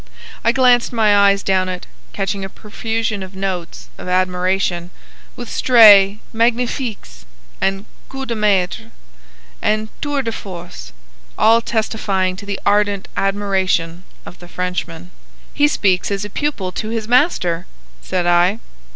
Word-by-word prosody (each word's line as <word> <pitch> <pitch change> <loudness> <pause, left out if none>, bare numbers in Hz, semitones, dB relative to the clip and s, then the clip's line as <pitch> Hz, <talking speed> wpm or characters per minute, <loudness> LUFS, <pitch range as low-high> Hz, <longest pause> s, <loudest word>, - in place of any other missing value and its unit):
I 230 - +4
glanced 250 -1 +3
my 220 -3 +3
eyes 200 0 +4
down 185 -1 +1
it, 180 -1 -5 0.3
catching 195 0 -3
a 195 - -5
profusion 225 0 -4
of 190 0 -9
notes 190 -3 -5
of - - -8
admiration, 180 -1 0 0.5
with 245 - -7
stray 210 -5 +6
"magnifiques," 230 - -2 0.8
"coup 270 0 -6
de 240 - -3
maîtres," 205 -5 0 0.7
and 215 0 0
"tours 290 -2 -1
de 230 - -1
force," 180 - -9 0.5
all 225 +2 +5
testifying 205 -5 -1
to 200 - -10
the 200 -1 -3
ardent 205 -1 +1
admiration 190 -4 -1 0.2
of 180 - -12
the 175 - -12
Frenchman. 180 -1 -5 0.4
"He 290 0 +3
speaks 190 -10 +1
as 200 0 -2
a 205 - -8
pupil 245 -11 -2
to 215 +4 -5
his 225 -1 -3
master," 225 - +1 0.3
said 180 - -2
I. 175 +4 +3
200 Hz, 135 wpm, -18 LUFS, 185-225 Hz, 0.8 s, stray